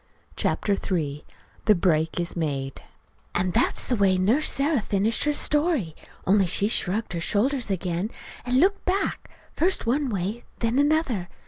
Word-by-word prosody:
CHAPTER 205 - 0
III 150 -7 -2 0.4
THE 215 - +5
BREAK 165 -2 +1
IS 175 0 -3
MADE 140 -5 -3 0.5
And 180 0 0
that's 240 - +1
the 250 - 0
way 195 -3 +3
Nurse 225 +12 +2
Sarah 280 -2 +1
finished 210 +5 0
her 295 - +2
story, 295 - +1 0.3
only 195 0 +3
she 200 +4 +2
shrugged 215 -1 0
her 170 - -2
shoulders 235 +8 0
again, 185 +1 -2 0.3
and 250 +1 +1
looked 395 +5 +2
back, 385 +2 -1 0.2
first 365 -3 +1
one 270 +4 +1
way, 205 +3 -3
then 230 +3 0
another. 285 - +1
210 Hz, 150 wpm, -25 LUFS, 180-275 Hz, 0.5 s, THE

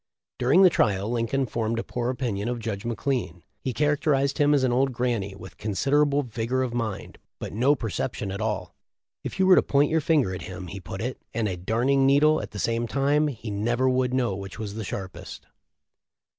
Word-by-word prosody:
During 135 +10 +5
the 185 - +7
trial 100 -5 +1
Lincoln 120 +3 0
formed 115 0 -2
a 115 - -1
poor 120 0 -3
opinion 120 -5 -2
of 125 - -2
Judge 110 -3 -4
McLean. 115 -8 -2 0.2
He 130 - -3
characterized 140 +1 +1
him 145 0 +4
as 135 - +2
an 130 - +2
"old 130 +2 +2
granny," 115 -6 -1
with 95 - -12
consid 105 +6 -2
erable 145 -1 +3
vigor 120 +2 -1
of 125 -2 -3
mind, 110 -5 -4 0.2
but - - -6
no 130 +7 +3
perception 110 -3 -3
at 100 +2 -5
all. 105 -5 -2 0.5
"If - - -5
you 190 - +3
were 185 0 +7
to - - +6
point 145 +1 +2
your 160 0 +2
finger 140 - +2
at 90 - -5
him," 95 0 -7
he 95 +3 -7
put 95 +2 -7
it, 125 +2 -4
"and 115 -2 +1
a 95 - -2
darning 125 +9 +2
needle 150 +3 +4
at - - -7
the 105 - -9
same 115 +2 0
time 140 +4 +2
he 115 -6 -5
never 120 +5 0
would 130 -1 +2
know 125 -6 0
which 95 0 -8
was 105 -2 -5
the 110 +1 -5
sharpest." 95 -1 -7
120 Hz, 210 wpm, -26 LUFS, 105-135 Hz, 0.5 s, the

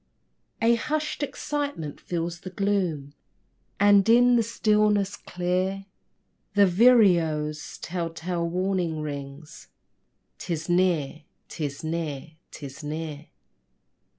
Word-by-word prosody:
A 230 +1 +5
hushed 300 +6 -2
excitement 285 - -4
fills 170 0 -3
the 185 - -8
gloom, 180 -7 -1 0.7
And, 205 +1 +5
in 245 +1 +6
the 235 - +4
stillness, 210 -3 +1
clear 185 +2 -2 0.7
The 205 0 +6
vireo's 175 -8 +3
tell 170 -1 -4
tale 170 +1 -3
warning 180 -3 -1
rings: 140 +1 -8 0.7
"'Tis 165 -3 -4
near 175 -4 +1 0.3
'tis 145 -2 -5
near 160 -2 -4 0.2
'tis 140 0 -9
near!" 155 0 -5
175 Hz, 95 wpm, -26 LUFS, 155-205 Hz, 0.7 s, in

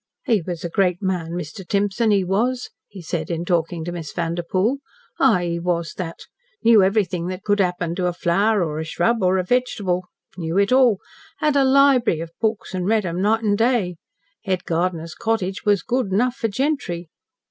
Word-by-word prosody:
"He 225 -8 +2
was 170 0 -6
a 170 - -3
great 180 -2 +1
man 180 -4 -2
Mr. 175 +2 -6
Timson 205 +4 0
he 200 -2 +3
was," 235 +7 -1 0.2
he 195 -4 -11
said, 160 -1 -3
in 170 0 -2
talking 170 -2 -1
to 175 - -3
Miss 165 -4 -6
Vanderpoel. 175 +8 0 0.4
"Ay, 220 -10 +4
he 170 0 -2
was 170 -2 -1
that. 170 -3 -6 0.4
Knew 225 -3 +7
everything 190 -3 +1
that 185 +1 -5
could 205 0 +1
happen 180 -3 0
to 180 0 -1
a 175 - -1
flower 195 +4 +2
or 155 -2 -3
a - - -2
s'rub 210 +8 0
or 185 0 +3
a 185 - +1
vegetable. 190 -5 0 0.3
Knew 165 0 -3
it 200 +2 +3
all. 255 -5 +5 0.4
Had 300 -1 +1
a 280 - +5
lib'ery 265 - +4
of 165 0 -6
books 220 -3 -1
an' 180 -1 -2
read 215 0 +2
'em 175 +1 -2
night 220 +3 +2
an' 205 -2 +2
day. 225 -6 +1 0.5
Head 185 -3 -1
gardener's 165 -1 -2
cottage 200 -4 -2
was 205 -4 +3
good 250 -5 -1
enough 240 +6 +2
for 225 - -1
gentry. 215 - -2
190 Hz, 190 wpm, -22 LUFS, 175-220 Hz, 0.5 s, Knew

